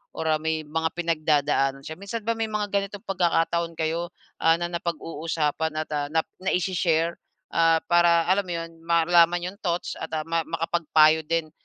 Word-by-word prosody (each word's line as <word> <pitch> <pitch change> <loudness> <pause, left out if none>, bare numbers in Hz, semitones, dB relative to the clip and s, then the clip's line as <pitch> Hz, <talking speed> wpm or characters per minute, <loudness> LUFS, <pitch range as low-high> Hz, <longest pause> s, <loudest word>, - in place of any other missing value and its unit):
or - - -3
ah, 155 -1 +2
may 160 0 -1
mga 160 +2 -1
pinagdadaanan 150 -5 +1
siya. 160 +3 -7
Minsan 210 +3 -5
ba 230 - 0
may 225 - -1
mga 210 -1 -2
ganitong 200 +1 -2
pagkakataon 170 -2 0
kayo, 165 +2 -1 0.3
ah, 165 0 +5
na 175 0 -3
napag-uusapan 160 -2 -2
at, - - -43
ah, 145 -1 -1
nap 160 +1 +1 0.2
naishi-share, 175 -3 +1 0.4
ah, 165 -1 +4
para 170 -1 +4
alam 195 +1 +3
mo 175 - -3
'yon, 165 0 -5
malaman 170 +1 +3
'yong 200 - -22
thoughts 175 -1 -2
at 160 - -4
ah, 155 - -2
ma 165 0 0
makapagpayo 160 -1 +3
din 165 -2 -1
165 Hz, 170 wpm, -25 LUFS, 160-175 Hz, 0.4 s, ah